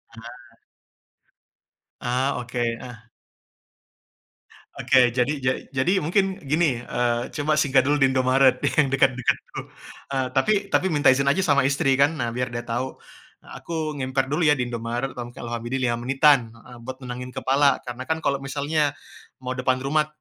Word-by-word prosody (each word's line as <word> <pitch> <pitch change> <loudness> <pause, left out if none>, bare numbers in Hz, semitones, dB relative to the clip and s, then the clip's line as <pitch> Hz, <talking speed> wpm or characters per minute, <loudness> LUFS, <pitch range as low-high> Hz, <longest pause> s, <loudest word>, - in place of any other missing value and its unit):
Nah. 115 +1 -13 1.5
Ah, 130 +3 0
oke, 120 0 -8 0.2
ah. 115 -3 -11 1.7
Oke, 125 -2 +4
jadi 125 +3 +1
ja 130 - +3 0.3
jadi 135 +8 +2
mungkin 190 +4 0
gini, 155 -6 +2
eee, 120 -1 -1
coba 150 0 +1
singgah 135 -3 +3
dulu 145 +2 +1
di 135 - +5
Indomaret 130 0 +3 0.2
yang 150 - +4
dekat-dekat 130 -2 +2
dulu, - - -5 0.5
eee, 130 -1 0
tapi 135 +11 +2 0.2
tapi 190 - +2
minta 145 -6 +4
izin 140 +1 +1
aja 180 +7 +2
sama 140 -6 +3
istri 140 0 +1
kan 145 +4 +4
nah 120 -5 -2
biar 125 +2 -2
dia 120 -1 -5
tau, 120 +2 -3 0.5
"Aku 160 -2 -5
ngemper 130 +1 -1
dulu 160 +2 +2
ya 150 - +5
di 125 - -1
Indomaret, 120 +3 -3
kurang 120 -1 -7
lebih 120 +1 -5
ya 125 -3 0
5 120 - -1
menitan" 140 +1 +5 0.2
heeh, 120 +2 -14
"buat 130 +1 -8
nenangin 125 0 -7
kepala." 140 +1 +2
Karena 125 +1 -6
kan 160 - 0
kalo 140 -1 0
misalnya 145 +2 -1 0.5
mau 125 - -3
depan 130 0 +2
rumah 150 +2 +1
130 Hz, 160 wpm, -23 LUFS, 125-145 Hz, 1.7 s, di